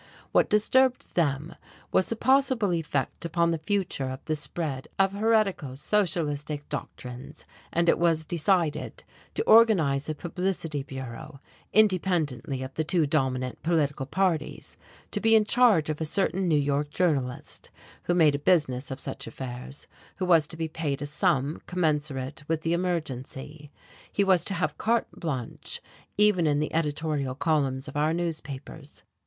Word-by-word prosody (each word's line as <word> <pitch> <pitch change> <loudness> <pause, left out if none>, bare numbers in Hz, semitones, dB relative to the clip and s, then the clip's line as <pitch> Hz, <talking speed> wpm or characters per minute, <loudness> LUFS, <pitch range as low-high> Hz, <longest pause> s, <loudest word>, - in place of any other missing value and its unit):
What - - +3
disturbed 255 +5 +2
them 150 -1 0 0.4
was 185 - +2
the 230 - 0
possible 260 -5 +2
effect 150 -5 -2
upon 170 0 +1
the 165 - -1
future 170 -6 -1
of 130 +1 -7
the 155 - -1
spread 150 -3 -3
of 195 0 +3
heretical, 200 - +1
socialistic 150 -5 -1
doctrines, 125 +4 -7 0.3
and 170 +1 +1
it - - +4
was 165 -2 +2
decided 165 -2 0 0.3
to - - 0
organize 175 - +5
a 155 - -2
publicity 170 -3 -3
bureau, 130 0 -8 0.3
independently 175 - +1
of 130 +1 -7
the 160 - -1
two 160 +1 +2
dominant 130 -4 -1
political 145 -4 0
parties, 170 -2 -1 0.4
to 205 - -1
be 225 0 +5
in 215 -1 +5
charge 220 -9 +4
of 155 0 -3
a - - +1
certain 190 +2 0
New 155 -3 +3
York 145 +1 0
journalist 145 -7 -2 0.4
who 175 - +1
made 160 -4 +5
a 140 - -1
business 145 -6 +1
of 135 0 -5
such - - -5
affairs, 125 +3 -7 0.3
who 185 - -2
was 165 -4 +4
to 165 - -6
be 160 0 -2
paid 150 -3 -3
a - - -2
sum 150 -2 0
commensurate 150 -5 -1
with 160 -1 0
the 165 +1 0
emergency. 150 -4 -4 0.4
He 200 - +2
was 190 -3 +4
to 195 - -1
have 155 -3 -2
carte 230 +1 +1
blanche, 130 -8 -5 0.4
even 205 -5 +4
in 145 -1 +2
the 150 - -2
editorial 150 -4 -1
columns 140 -3 0
of - - -9
our 155 +2 +1
newspapers. 155 -3 -6
155 Hz, 155 wpm, -27 LUFS, 140-180 Hz, 0.4 s, organize